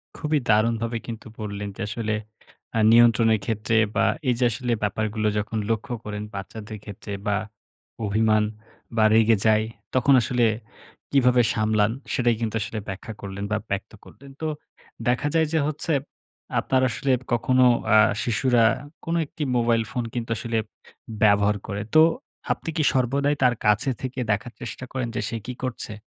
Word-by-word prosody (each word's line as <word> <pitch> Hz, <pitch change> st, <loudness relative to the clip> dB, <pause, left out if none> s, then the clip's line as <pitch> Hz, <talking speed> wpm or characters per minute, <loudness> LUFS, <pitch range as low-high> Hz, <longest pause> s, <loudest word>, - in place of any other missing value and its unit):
খুবই 150 Hz, -1 st, 0 dB
দারুণভাবে 115 Hz, +2 st, +2 dB
কিন্তু 115 Hz, -1 st, -7 dB
বললেন 100 Hz, -1 st, -4 dB
যে -, -, -7 dB
আসলে 110 Hz, 0 st, -2 dB, 0.6 s
আ -, -, +3 dB
নিয়ন্ত্রণের 115 Hz, -1 st, +5 dB
ক্ষেত্রে 110 Hz, +1 st, 0 dB, 0.2 s
বা 115 Hz, 0 st, +3 dB, 0.2 s
এই -, -, +4 dB
যে -, -, +2 dB
আসলে 120 Hz, +3 st, -3 dB
ব্যাপারগুলো 110 Hz, +1 st, -1 dB
যখন 105 Hz, +2 st, -2 dB
লক্ষ্য 115 Hz, +3 st, -1 dB
করেন 105 Hz, 0 st, -5 dB
বাচ্চাদের 105 Hz, +2 st, -7 dB
ক্ষেত্রে 105 Hz, 0 st, -9 dB, 0.2 s
বা 100 Hz, 0 st, +2 dB, 0.7 s
অভিমান 110 Hz, +1 st, +3 dB, 0.5 s
বা 110 Hz, -, +5 dB
রেগে 110 Hz, -1 st, +5 dB
যায়, 110 Hz, 0 st, +4 dB, 0.3 s
তখন 130 Hz, +2 st, +4 dB
আসলে 120 Hz, +1 st, +1 dB, 0.7 s
কীভাবে 125 Hz, -3 st, +4 dB
সামলান? 110 Hz, -1 st, +2 dB, 0.2 s
সেটাই 120 Hz, -2 st, +2 dB
কিন্তু 115 Hz, -1 st, -2 dB
আসলে 110 Hz, 0 st, -4 dB
ব্যাখ্যা 100 Hz, +3 st, -6 dB
করলেন 100 Hz, 0 st, -6 dB
বা 110 Hz, -, +2 dB
ব্যক্ত 100 Hz, +1 st, -3 dB
করলেন। 140 Hz, 0 st, -15 dB
তো 160 Hz, -, -1 dB, 0.6 s
দেখা 125 Hz, +4 st, +1 dB
যায় 160 Hz, -1 st, +3 dB
যে 160 Hz, -, +3 dB
হচ্ছে 155 Hz, +2 st, -1 dB, 0.7 s
আপনার 130 Hz, -1 st, +1 dB
আসলে 130 Hz, +4 st, -1 dB, 0.2 s
কখনো 130 Hz, +2 st, +3 dB, 0.3 s
আ -, -, +8 dB, 0.3 s
শিশুরা 120 Hz, 0 st, +2 dB, 0.4 s
কোনো 165 Hz, +1 st, 0 dB
একটি 150 Hz, +1 st, -6 dB
মোবাইল 115 Hz, -1 st, +2 dB
ফোন 125 Hz, -2 st, -2 dB
কিন্তু 120 Hz, -2 st, -4 dB
আসলে 115 Hz, -1 st, -2 dB, 0.7 s
ব্যবহার 105 Hz, 0 st, +4 dB
করে। 100 Hz, -1 st, -3 dB
তো 155 Hz, -, +9 dB, 0.5 s
আপনি -, -, -8 dB
কি 155 Hz, -, +2 dB
সর্বদাই 140 Hz, +3 st, +1 dB
তার 125 Hz, -1 st, +4 dB
কাছে 105 Hz, +5 st, +3 dB
থেকে 130 Hz, 0 st, -4 dB
দেখার 105 Hz, +4 st, -2 dB
চেষ্টা 120 Hz, +2 st, -6 dB
করেন 130 Hz, -2 st, -2 dB
যে -, -, -1 dB
সে 115 Hz, -, -3 dB
কি 125 Hz, -, -3 dB
করছে? 125 Hz, -4 st, -3 dB
115 Hz, 155 wpm, -24 LUFS, 105-125 Hz, 0.7 s, তো